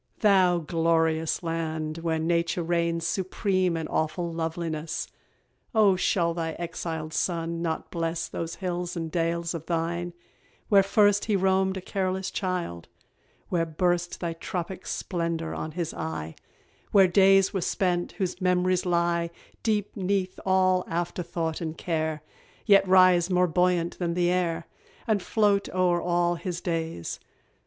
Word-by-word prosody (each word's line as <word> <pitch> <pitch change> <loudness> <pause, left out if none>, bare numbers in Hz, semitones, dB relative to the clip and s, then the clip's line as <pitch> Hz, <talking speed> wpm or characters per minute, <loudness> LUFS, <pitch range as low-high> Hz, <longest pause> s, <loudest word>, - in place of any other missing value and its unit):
Thou 190 -4 +5
glorious 165 0 +1
land! 160 -1 -3
where 165 -1 -1
Nature 170 +2 0
reigns 170 0 0
Supreme 185 0 0
in 160 - -3
awful 170 +2 -1
loveliness, 165 -1 -3 0.7
O 205 -3 +5
shall 170 -2 +1
thy 165 -1 -3
exiled 165 -2 -5
son 165 -1 -1
not 165 -2 -3
bless 165 -1 -2
Those 165 0 -5
hills 180 -1 -3
and 165 -1 -4
dales 170 0 -1
of 165 -2 -6
thine, 170 +1 -2 0.6
where 200 -2 +7
first 205 +1 +3
He 215 - +1
roamed 190 0 +2
a - - -5
careless 190 0 -2
child; 180 - -3 0.6
where 170 -2 +1
burst 175 +2 0
Thy 170 -2 -2
tropic 175 +2 -5
splendour 165 -2 -2
on 155 0 -5
his 170 -1 -3
eye; 80 -1 -4 0.6
Where 195 -2 +6
days 195 +1 +5
were 190 - -1
spent, 175 0 0
whose 185 -2 -3
mem'ries 180 0 +2
lie 170 -1 +1 0.3
Deep 210 -2 -1
'neath 190 -1 -1
all 185 -1 +3
afterthought 170 -1 -3
and 160 -1 -4
care, 160 -2 -2 0.4
Yet 200 -2 +5
rise 185 -1 +5
more 180 -1 +3
buoyant 175 0 +1
than 170 -2 -1
the 175 0 +2
air, 170 -2 0 0.4
And 215 -3 +1
float 205 0 +2
o'er 180 -2 +2
all 175 0 +1
his 170 0 -4
days? 165 - -3
175 Hz, 140 wpm, -27 LUFS, 165-185 Hz, 0.7 s, where